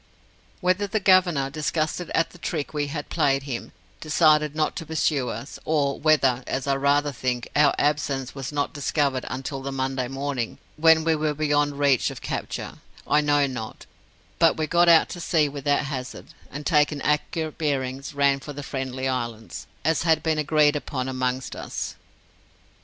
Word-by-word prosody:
Whether 185 +2 +1
the 215 +2 0
Governor, 180 -8 +3
disgusted 155 +3 -2
at 165 - +1
the 175 - -16
trick 155 -3 -3
we 145 -1 -1
had 145 0 -5
played 135 -4 +1
him, 135 -4 -5 0.3
decided 150 -1 +3
not 155 -1 0
to 165 - -5
pursue 150 -5 0
us, 115 +6 -7
or 145 -3 0
whether 135 -5 +3
as 130 - -2
I 140 - +1
rather 145 +1 +2
think 125 -2 -2
our 145 -1 +5
absence 145 -3 0
was 135 -1 -5
not 145 -1 -1
discovered 140 -2 -1
until 135 +1 -4
the 140 +1 -4
Monday 130 -1 -2
morning, 135 -2 -3 0.2
when 160 0 +5
we 165 0 +2
were 150 -1 -1
beyond 145 -1 +1
reach 140 -3 +3
of - - -8
capture, - - -5 0.3
I 150 - +3
know 145 -1 +3
not, 125 -5 -6 0.5
but 165 - +4
we 155 - 0
got 175 +2 +4
out 165 -1 +6
to 175 - -7
sea 160 -3 +2
without 145 0 0
hazard, 130 -2 -6 0.2
and, 150 +1 -7
taking 150 -3 +2
accurate 155 +1 -1
bearings, 135 -2 -2
ran 140 -1 +3
for 145 +2 -8
the 145 0 -7
Friendly 130 -1 -3
Islands, 120 -4 -4 0.2
as 160 0 +2
had 160 -2 +2
been 160 -1 +1
agreed 150 0 +3
upon 130 -3 -3
amongst 130 0 -2
us. - - -5
145 Hz, 170 wpm, -24 LUFS, 135-155 Hz, 0.5 s, out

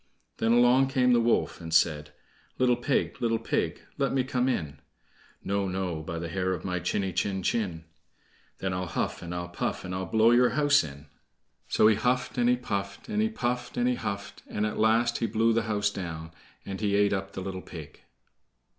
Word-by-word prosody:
Then 115 +1 +2
along 125 +2 +5
came 125 -2 +3
the 120 - +5
wolf, 115 -5 +1
and 80 -1 -7
said: 75 -2 +2 0.5
"Little 125 -1 +4
pig, 120 +3 -1
little 115 -1 +2
pig, 115 - -1 0.2
let 140 - +1
me 135 -1 +2
come 125 0 0
in." 75 - -2 0.6
"No, 100 0 0
no, 90 -4 -2
by 85 +1 -5
the 85 0 -4
hair 95 +2 -1
of 85 -1 -5
my 90 -1 -1
chiny 95 +2 -1
chin 95 +1 -1
chin." 90 -7 -1 0.7
"Then 95 -1 -2
I'll 90 0 -2
huff, - - -2
and 85 - -7
I'll 90 0 -4
puff, 85 - -3
and 90 - -5
I'll 95 0 -3
blow 110 +4 +4
your 125 +1 +5
house 145 -5 +5
in." 70 -1 -9 0.6
So - - +3
he 110 - +7
huffed, 125 0 0
and 120 0 +4
he 125 - +4
puffed, 100 - -4
and 210 0 0
he 220 - +2
puffed, 125 - -3
and 245 0 +2
he 250 - +3
huffed, 100 - -5
and 105 - -1
at 105 - -3
last 115 +2 +3
he 115 - 0
blew 115 +1 +2
the 115 - +2
house 105 -1 +1
down, 80 -5 -6 0.3
and 95 0 -5
he 100 -2 +1
ate 100 0 +3
up 95 0 -3
the 95 - -5
little 95 0 -5
pig. 80 -6 -10
100 Hz, 205 wpm, -28 LUFS, 90-120 Hz, 0.7 s, he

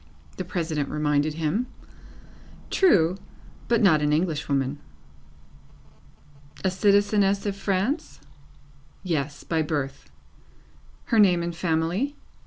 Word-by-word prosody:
the 185 - -3
President 160 -5 -2
reminded 150 0 0
him. 165 +10 -1 1.0
True, 185 - +4 0.5
but 235 -2 +2
not 160 -6 +5
an 150 0 +1
English 155 -1 0
woman. 140 0 0 1.8
A 190 - +2
citizeness 200 +1 +2
of 200 -1 -1
France? 200 - -2 0.8
Yes. 150 -5 -2
By 160 -1 0
birth. 145 -3 -3 1.0
Her 230 - +2
name 180 -4 +5
and 170 0 -4
family? 170 - -1
170 Hz, 100 wpm, -25 LUFS, 150-200 Hz, 1.8 s, not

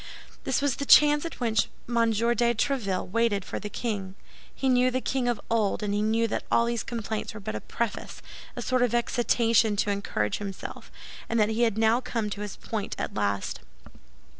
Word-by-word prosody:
This 265 +1 0
was 285 -3 +1
the 280 - -3
chance 295 +1 +7
at 335 - -6
which 225 -5 +1 0.2
M. 230 -1 +2
de 235 +2 +2
Tréville 215 -7 -1
waited 225 -3 +1
for - - -4
the 210 - -6
king. 200 -5 -4 0.4
He 270 - -2
knew 250 0 +4
the 255 +1 0
king 260 -1 -1
of 240 -3 0
old, 220 -2 +1
and 205 -1 -1
he 205 - +1
knew 225 +2 +2
that - - -2
all 235 - +4
these 235 -1 -1
complaints 220 -2 -4
were - - -6
but 195 - -5
a 110 - -4
preface—a 235 -2 -6
sort 255 -1 +1
of 240 -1 +2
excitation 230 -2 +2
to 205 0 +1
encourage 110 - -1
himself—and 205 +3 -6
that 210 0 +3
he 220 +2 -1
had 225 -3 +2
now 225 +2 +3
come 225 -4 -2
to 205 - -5
his 205 -2 -5
point 220 -3 -4
at - - -3
last. 100 -1 -1
225 Hz, 190 wpm, -27 LUFS, 205-240 Hz, 0.4 s, chance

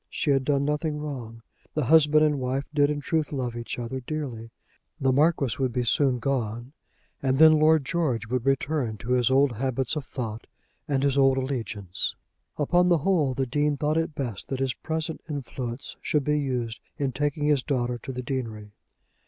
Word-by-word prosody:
She 150 - 0
had 135 -1 +2
done 140 -1 +2
nothing 150 +1 -1
wrong. 125 -7 -6 0.3
The 155 -4 +1
husband 155 +1 +5
and 150 -2 +1
wife 130 +2 -1
did 145 -1 +4
in 145 -1 -2
truth 155 +1 -1
love 125 -4 -3
each 120 0 -5
other 120 +2 -4
dearly. 125 -5 -5 0.5
The 135 -1 +2
Marquis 140 -3 +2
would 130 -2 +1
be 125 +1 0
soon 130 +2 +2
gone, 120 0 -2 0.5
and 135 -1 +1
then 155 0 +7
Lord 155 -2 +4
George 135 - 0
would 125 +1 -2
return 135 -3 0
to 115 +4 -5
his 125 -2 +3
old 135 +1 +4
habits 130 +3 -1
of 150 - -2
thought 115 -4 -6 0.4
and 140 -3 0
his 140 -1 +2
old 135 -1 +5
allegiance. 115 -8 -3 0.4
Upon 175 +4 +3
the 175 - +5
whole 155 -5 +1
the 135 - 0
Dean 145 +3 0
thought 150 +2 0
it 165 -1 -1
best 120 -8 -4
that 135 - -3
his 135 -2 0
present 160 +2 -4
influence 130 -3 -5
should 150 -2 +1
be 150 +1 +1
used 125 -5 -2 0.2
in 140 -2 -1
taking 145 +2 -1
his 145 -3 +3
daughter 125 -3 -1
to 130 - -6
the 125 0 -5
deanery. 115 -6 -4
135 Hz, 185 wpm, -26 LUFS, 125-150 Hz, 0.5 s, then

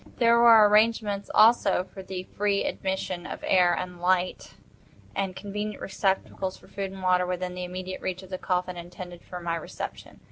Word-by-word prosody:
There 235 -1 +5
were 225 -3 +8
arrangements 210 -1 +2
also 215 -5 +5
for 190 +1 -11
the 185 -1 -6
free 200 +1 0
admission 190 -2 -3
of - - -7
air 180 -2 +4
and 180 -1 -6
light, 180 0 0 0.6
and 195 -2 -2
convenient 210 +1 -5
receptacles 190 -1 -2
for - - -19
food 195 -1 -4
and 190 -1 -9
water, 180 0 +3
within 180 0 -3
immediate 180 +1 -5
reach 185 0 -4
of 190 - -14
the 185 - -4
coffin 180 -1 -1
intended 175 0 -9
for 180 - -8
my 170 -1 -2
reception. 165 - -7
185 Hz, 170 wpm, -27 LUFS, 180-200 Hz, 0.6 s, were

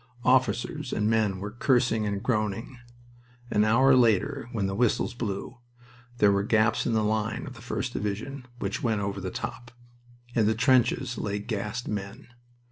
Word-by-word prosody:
Officers 130 +2 +1
and 105 - 0
men 110 -4 +1
were 100 +2 -5
cursing 120 -2 +2
and 100 0 -3
groaning. 115 +1 -2 0.7
An 105 - +3
hour 130 +5 +5
later, 125 +3 +2
when 110 -5 -1
the 95 - -1
whistles 115 +2 +1
blew, 120 +2 -5 0.6
there 105 -4 +5
were 100 0 +2
gaps 110 +1 +2
in 120 - +1
the 110 -1 +2
line 110 +1 -1
of 130 - -8
the 120 - -13
1st 125 +1 -3
Division 125 +6 -4
which - - -3
went 110 -4 0
over 100 -1 -3
the 95 - -3
top. 120 +4 -6 0.6
In 110 -3 +3
the 110 - +2
trenches 125 0 +2
lay 105 -1 -2
gassed 105 +2 -4
men. 100 +2 -5
110 Hz, 165 wpm, -27 LUFS, 105-125 Hz, 0.7 s, hour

